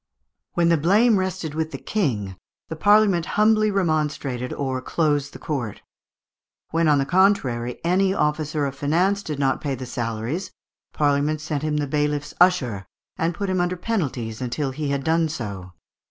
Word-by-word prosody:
When 170 -1 +3
the 170 - +4
blame 205 +7 +4
rested 185 -4 -3
with 160 0 -2
the - - -6
King, 110 - -2 0.3
the 160 - -4
Parliament 205 -1 +4
humbly 215 0 +4
remonstrated 150 -9 -1
or 130 -2 -2
closed 145 -1 0
the - - -10
court. 125 -9 -4 0.9
When, 165 0 +2
on 150 -1 +5
the 135 - +1
contrary, 135 -10 +2
an 180 +3 +3
officer 150 -2 0
of 135 - -3
finance 175 +9 +1
did 155 -7 -5
not 135 -1 +1
pay 140 -2 -2
the 130 0 -7
salaries, 120 - -3 0.4
Parliament 145 +1 +1
sent 150 -1 -3
him 150 -1 -1
the 150 - 0
bailiff's 150 +1 -1
usher, 125 - +3 0.3
and 165 +1 0
put 200 - -3
him 185 -1 +1
under 175 +1 0
certain 175 - -18
penalties 130 - -2
until 135 +3 -2
he 145 +2 -3
had 140 -1 -1
done 160 +1 +2
so. 100 - -6
150 Hz, 170 wpm, -23 LUFS, 135-175 Hz, 0.9 s, on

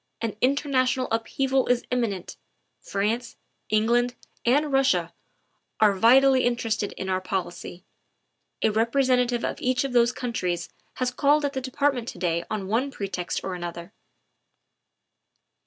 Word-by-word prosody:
An 225 -2 -3
international 260 -1 +1
upheaval 265 +4 0
is 245 -1 +2
imminent. 220 -7 -2 0.5
France, 225 +4 -2 0.3
Eng 215 0 +2
land, 245 +1 +2 0.3
and 290 +4 +3
Russia 270 0 +2 0.7
are 210 -2 +5
vitally 255 +6 +5
interested 225 -4 -1
in 190 - -6
our 185 0 0
policy; 185 -1 -5 0.8
a 220 - +4
representative 245 +2 +2
of - - -4
each 255 0 +1
of 270 -2 -4
those 240 0 +4
countries 180 -10 -3 0.3
has 250 -1 -1
called 290 +4 +2
at 280 - -2
the 265 - -3
Department 260 -1 0
to - - -6
day 170 -1 -1
on 210 -3 -3
one 235 +7 0
pretext 195 -7 -4
or 190 - -3
another. 175 +1 -7
240 Hz, 135 wpm, -25 LUFS, 200-260 Hz, 0.8 s, are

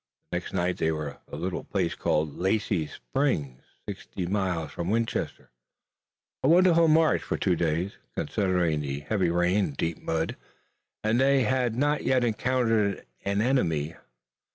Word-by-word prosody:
The 90 - 0
next 90 - -10
night 90 -1 0
they 80 - +1
were 75 -2 -3
at - - -18
a - - -5
little 90 0 -3
place 90 -4 -1
called 75 -1 0
Lacy's 95 -4 0
Springs, 75 - -1 0.3
sixty 90 - -5
miles 90 -4 -1
from 85 +1 -4
Winchester, 115 - -2 0.9
a - - +2
wonderful 170 0 +6
march 160 0 +4
for - - -2
two 90 -3 +2
days, 85 +4 -1 0.2
considering 90 -6 +1
the 70 0 -4
heavy 90 +3 0
rains 90 +4 +2
and 70 - -8
deep 80 -1 -2
mud, 80 0 -2 0.7
and 110 +3 +2
they 135 -1 +4
had 125 -1 +1
not 145 +3 +1
yet 130 -1 +2
encountered 115 -3 +1 0.2
an 100 +1 +1
enemy. 80 - +1
95 Hz, 155 wpm, -27 LUFS, 80-120 Hz, 0.9 s, wonderful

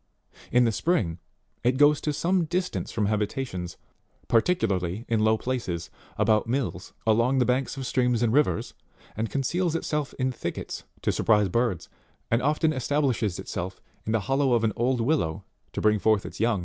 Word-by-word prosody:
In 125 +1 +5
the 115 - +3
spring, 105 - 0 0.4
it 125 +2 +2
goes 145 +1 +5
to 150 - 0
some 175 +4 +1
distance 180 +3 -2
from 110 -3 0
habitations, 105 - -2 0.5
particularly 110 - +1
into 110 -2 +1
low 110 0 +4
places, 100 -10 -3 0.3
about 110 0 +3
mills, 120 -8 -2
along 115 +4 +3
the 125 - +3
banks 130 +2 0
of 135 - -4
streams 125 -2 +1
and 115 -1 +2
rivers, 140 - +1 0.4
and 110 +1 -2
conceals 165 +5 0
itself 150 -3 -2
in 130 0 0
thickets 125 - -5 0.2
to - - +2
surprise 105 -3 +3
birds, 115 -3 0 0.4
and 115 +2 +3
often 155 +3 +2
establishes 130 - 0
itself 95 +2 -5 0.2
in 110 - -3
the 115 -1 +2
hollow 135 +3 +1
of 115 -1 +2
an 110 -2 +1
old 125 +1 +1
willow 115 - 0 0.3
to - - -4
bring 105 0 +3
forth 110 -1 +2
its - - -8
young. 115 -2 +2
120 Hz, 170 wpm, -26 LUFS, 105-140 Hz, 0.5 s, In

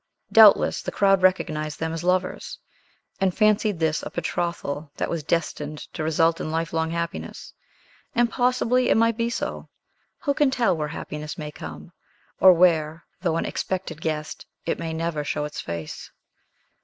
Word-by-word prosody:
Doubtless 220 -2 +6
the - - -4
crowd 195 -1 +3
recognized 155 -5 +1
them 160 0 -2
as 165 0 -4
lovers, 180 +1 -1 0.6
and 190 -2 +1
fancied 215 -2 +3
this 160 -1 0
a - - -6
betrothal 160 -3 -3
that - - -2
was 170 - -2
destined 150 -1 -2 0.2
to - - -5
result 165 +1 +2
in - - -3
lifelong 160 0 -1
happiness. 170 0 -5 0.6
And 240 0 +4
possibly 250 0 +1
it - - +4
might 230 0 +3
be 230 +1 0
so. - - -4 0.5
Who 285 -3 +1
can 290 -1 +3
tell 235 -8 +2
where 155 -2 -2
happiness 150 0 -6
may 150 -1 -5
come; 75 - -9 0.5
or 190 - +9
where, 165 -3 +2 0.2
though 170 -3 0
an - - -1
expected 185 -4 -4
guest, 155 -1 -4 0.2
it - - -1
may 165 - -3
never 160 -2 -2
show 150 +1 -2
its 150 - -6
face? 85 -2 -6
165 Hz, 160 wpm, -24 LUFS, 155-195 Hz, 0.6 s, or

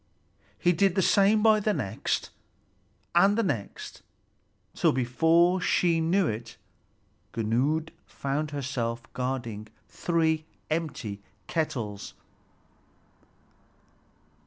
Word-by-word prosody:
He 175 - +3
did 185 +1 +2
the 190 - +3
same 205 +3 +4
by 220 -1 +6
the 210 0 0
next, 100 +1 -2 0.8
and 195 +5 +5
the 230 - +2
next, 120 - -4 0.7
till - - +3
before 165 +9 +3
she 170 -2 +2
knew 180 +4 +2
it, 115 -2 -4 0.8
Gunnlöd 130 +9 0 0.2
found 145 +2 -2
herself 125 -5 -3
guarding 120 -4 -3 0.2
three 160 -2 0 0.2
empty 140 -11 -3 0.2
kettles. 120 -11 -3
155 Hz, 90 wpm, -27 LUFS, 120-175 Hz, 0.8 s, by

